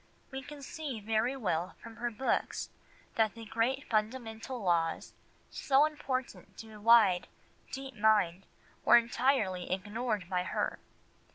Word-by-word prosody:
We 265 0 -5
can 285 +1 -10
see 280 -5 -5
very 220 +5 0
well 180 -7 -1
from 230 -1 -11
her 240 0 -1
books 240 +3 -1 0.5
that 220 -2 +2
the 230 -1 -9
great 235 +6 -1
fundamental 225 +2 -2
laws 170 -5 0 0.4
so 275 +1 +3
important 270 -4 -4
to 220 -1 -10
a 210 - -12
wide, 210 -5 +6 0.4
deep 270 0 -6
mind 205 -4 +2 0.4
were - - +8
entirely 230 -6 +1
ignored 205 +1 -2
by 180 -1 0
her. 180 - -2
225 Hz, 130 wpm, -32 LUFS, 205-260 Hz, 0.5 s, were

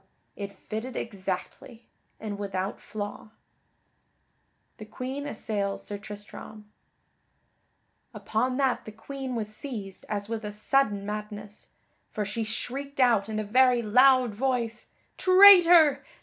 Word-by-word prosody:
it 200 -1 -6 0.2
fitted 230 +4 -5
exactly, 200 +3 -6 0.3
and 210 -2 -6
without 195 -1 -4
flaw. 205 -1 -6
[Sidenote: - - -33 1.5
The 215 - -9
Queen 260 +6 -6
assails 205 -5 -3
Sir 205 -1 -6
Tristram] 210 +1 -10 1.4
Upon 255 +4 -2
that 270 -2 0
the 215 - -8
Queen 265 +3 -7
was 215 -2 -5
seized 215 -8 -7
as 205 -1 -3
with 225 0 -4
a 210 0 -6
sudden 210 -2 0
madness; 210 0 -7 0.4
for 210 - -3
she 210 +3 -3
shrieked 275 +6 -5
out 230 -5 +3
in 215 - -3
a 215 - -1
very 250 +3 +3
loud 250 +1 +4
voice, 235 -1 -2 0.3
"Traitor! 350 -6 +7
220 Hz, 120 wpm, -27 LUFS, 205-260 Hz, 1.5 s, Traitor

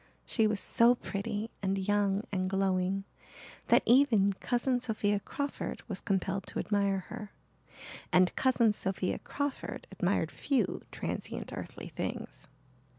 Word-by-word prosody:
She 225 -3 +2
was 210 -1 +1
so 235 +1 +5
pretty 215 0 -4
and 195 0 0
young 200 +1 +1
and 185 -2 0
glowing 195 0 +1 0.6
that - - +5
even 230 -6 +5
Cousin 245 +4 0
Sophia 215 -4 +1
Crawford 285 +7 -4
was 200 -5 -3
compelled 195 0 -1
to - - -5
admire 200 -2 +1
her 210 -1 -7 0.8
and 180 0 +4
Cousin 240 -4 +3
Sophia 190 -2 -2
Crawford 285 -1 -4
admired - - 0
few 275 -3 0
transient - - -4
earthly - - -7
things. - - -5
205 Hz, 125 wpm, -31 LUFS, 195-235 Hz, 0.8 s, so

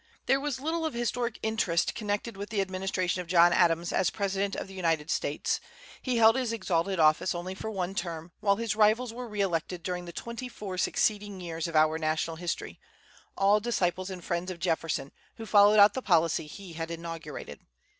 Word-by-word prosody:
There 270 +2 +3
was 280 -2 -3
little 325 +4 -2
of 315 -5 -2
historic 240 0 -1
interest 220 -6 +1
connected 210 +1 -3
with 200 +1 -6
the 215 - -1
administration 185 -1 -1
of 175 - -10
John 175 0 +5
Adams 170 -1 +2
as 185 - +2
President 200 -1 -1
of - - -5
the 195 - -11
United 165 -4 0
States. 145 - -1 0.4
He 255 -2 -1
held 225 0 +6
his 255 -3 0
exalted 190 -4 -1
office 155 +3 +3
only 175 +2 -4
for 215 +3 -6
one 190 -3 -3
term, 170 -3 -4
while 200 -2 +3
his 225 0 -2
rivals 220 +3 +3
were 245 +1 -6
re 210 -2 -3
elected 175 -2 -1
during 180 -1 -3
the 170 - -7
twenty 235 +7 -6
four 195 -6 -6
succeeding 205 0 0
years 165 -2 -4
of 165 - -6
our 155 +1 +4
national 160 +1 -1
history, 175 0 -4 0.6
all 200 +2 +4
disciples 185 -5 -1
and 185 -2 -7
friends 175 +1 -2
of 185 - -5
Jefferson, 165 -4 -1 0.2
who 225 - -8
followed 205 0 +6
out 205 0 +8
the 260 - -3
policy 165 -6 +2
he 185 +2 -10
had 165 0 -4
inaugurated. 165 -3 -7
190 Hz, 195 wpm, -29 LUFS, 170-215 Hz, 0.6 s, out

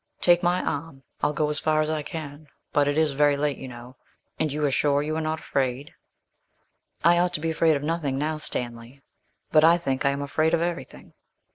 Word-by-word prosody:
Take 175 0 +4
my 175 0 +1
arm; 145 -2 -4 0.2
I'll 145 - +2
go 150 0 0
as 150 - -2
far 155 -1 +1
as 155 - +1
I 155 -1 -1
can, 150 -1 -8 0.3
but 145 -1 +3
it 145 +1 0
is 155 -2 +3
very 145 +1 +3
late 145 -1 -1
you 135 - -7
know 125 +1 -11 0.4
and 155 - 0
you 150 +1 -1
are 140 - +1
sure 145 +1 +2
you 155 +1 -2
are 160 - -1
not 155 0 -2
afraid?' 135 0 -2 1.1
'I 170 +1 +5
ought 180 0 +1
to - - -1
be 165 +1 -1
afraid 160 -1 +3
of 140 - -3
nothing 150 -4 -1
now, 155 +2 -1
Stanley, 120 -1 -5 0.5
but 155 -1 +5
I 165 +2 +6
think 135 -6 -2
I 140 - +3
am 140 +1 -2
afraid 155 +3 +1
of 165 - -2
everything.' 170 -7 -6
150 Hz, 220 wpm, -25 LUFS, 140-160 Hz, 1.1 s, I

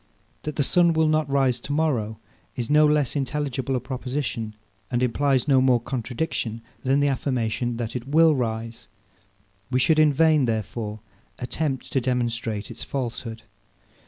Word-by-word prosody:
That 150 -1 -5
the 145 - +2
sun 170 +4 +4
will 160 0 +3
not 155 -2 +1
rise 135 -3 +2
to 140 - -7
morrow 130 -8 0 0.4
is 120 +2 -3
no 150 0 +6
less 150 -3 +1
intelligible 135 -2 -2
a - - +1
proposition, 125 -4 -4 0.3
and 120 0 0
implies 130 +2 +1
no 135 -2 +5
more 130 -2 +4
contradiction 120 -2 -3 0.2
than 135 +1 +2
the 145 - +3
affirmation, 120 -3 -1
that 115 0 -4
it 125 +1 -4
will 160 +2 +5
rise. 115 -3 -3 0.8
We 130 -1 +1
should 155 +4 +4
in 155 -1 +6
vain, 155 -1 +4
therefore, 110 -1 -3 0.4
attempt 135 +1 -3
to 135 - +2
demonstrate 115 -4 -2
its - - -7
falsehood. 115 -3 -4
130 Hz, 155 wpm, -24 LUFS, 115-145 Hz, 0.8 s, no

